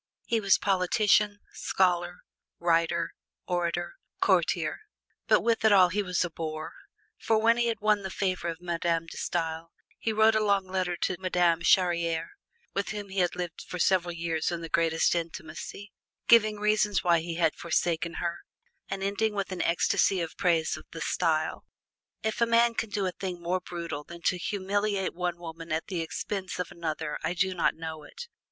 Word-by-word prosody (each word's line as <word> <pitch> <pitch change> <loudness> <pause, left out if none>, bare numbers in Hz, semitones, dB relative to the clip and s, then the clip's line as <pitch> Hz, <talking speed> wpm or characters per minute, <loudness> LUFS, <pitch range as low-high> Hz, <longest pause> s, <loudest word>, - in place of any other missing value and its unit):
He 230 - +1
was 200 -2 +4
politician, 205 +2 +2
scholar, 180 -1 0 0.4
writer, 170 0 +1 0.3
orator, 175 -1 -2 0.2
courtier. - - +2 0.5
But - - +5
with 230 -1 +1
it 220 - +6
all 185 -3 +7
he 205 +4 0
was 180 -2 0
a 175 - -6
boor, 155 -1 -5 0.5
for 225 - +2
when 230 +2 +4
he 240 0 +2
had 225 -2 -2
won 210 -1 +3
the 190 - -5
favor 185 -3 -1
of 165 0 -4
Madame 170 -1 -1
De 165 - -10
Stael 165 -1 -2 0.3
he 225 - -1
wrote 220 +1 +5
a 220 0 +2
long 200 -2 +2
letter 185 -2 -1
to 185 - 0
Madame 175 -2 +2
Charriere, 170 -2 +2 0.4
with 200 - -1
whom 205 -2 -5
he 190 0 -2
had 180 -1 +1
lived 175 -2 -5
for 180 - -7
several 175 -1 +2
years 165 -2 -1
in 170 -1 -3
the 165 - -6
greatest 165 -1 +2
intimacy, 170 +4 -5 0.4
giving 215 -2 +6
reasons 210 -1 +2
why 170 -2 +4
he 165 +1 -4
had 165 -2 +2
forsaken 170 0 -1
her, 170 0 -2 0.5
and 195 0 -3
ending 210 +2 0
with 200 -1 -2
an 185 - -2
ecstacy 180 +2 +2
in 170 - -1
praise 165 -4 +1
of 155 - -11
the 165 - -7
Stael. 160 -3 0 0.6
If 220 +1 -2
a 235 - +5
man 235 0 +4
can 225 -1 -2
do 205 -1 -1
a 185 - 0
thing 180 -1 -5
more 175 +2 -1
brutal 170 -5 -5
than 170 +2 -11
to 180 - +1
humiliate 200 +1 -1
one 175 -1 -2
woman 165 -1 -8
at 160 +1 -1
the 180 -4 -2
expense 185 +3 -4
of 180 -3 -3
another, 160 -2 -4
I 165 +2 -1
do 185 +1 +1
not 175 - +1
know 160 -1 -6
it. 150 - -10
180 Hz, 185 wpm, -28 LUFS, 170-200 Hz, 0.6 s, all